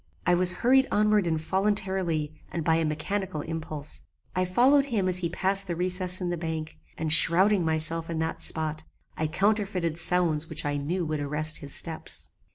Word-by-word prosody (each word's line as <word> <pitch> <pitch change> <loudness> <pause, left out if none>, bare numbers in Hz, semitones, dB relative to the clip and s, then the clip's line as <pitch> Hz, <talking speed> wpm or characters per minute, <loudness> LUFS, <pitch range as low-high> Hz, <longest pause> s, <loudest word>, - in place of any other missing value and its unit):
I 180 - +3
was 180 +1 +4
hurried 265 +6 +2
onward 210 -3 +2
involuntarily 185 -2 -1 0.2
and 165 - -4
by 160 0 +2
a 165 - 0
mechanical 155 +2 -3
impulse. 155 -2 -6 0.3
I 185 0 +1
followed 260 +10 +3
him 215 -9 -1
as 180 0 0
he 170 -2 -2
passed 195 +3 +1
the 170 - -3
recess 180 +1 -1
in 180 -2 -3
the 175 - -4
bank, 160 -1 -5 0.2
and 155 -1 +5
shrowding 185 +4 +7
myself 160 +1 -1
in 165 - -3
that 160 0 -3
spot, 155 -1 -3 0.3
I 155 - -2
counterfeited 190 -2 -1
sounds 165 -3 +1
which 155 0 -1
I 145 0 -1
knew 170 +5 -3
would 155 -1 -3
arrest 150 +2 -2
his 140 -1 -3
steps. 160 -2 -2
170 Hz, 175 wpm, -26 LUFS, 155-190 Hz, 0.3 s, shrowding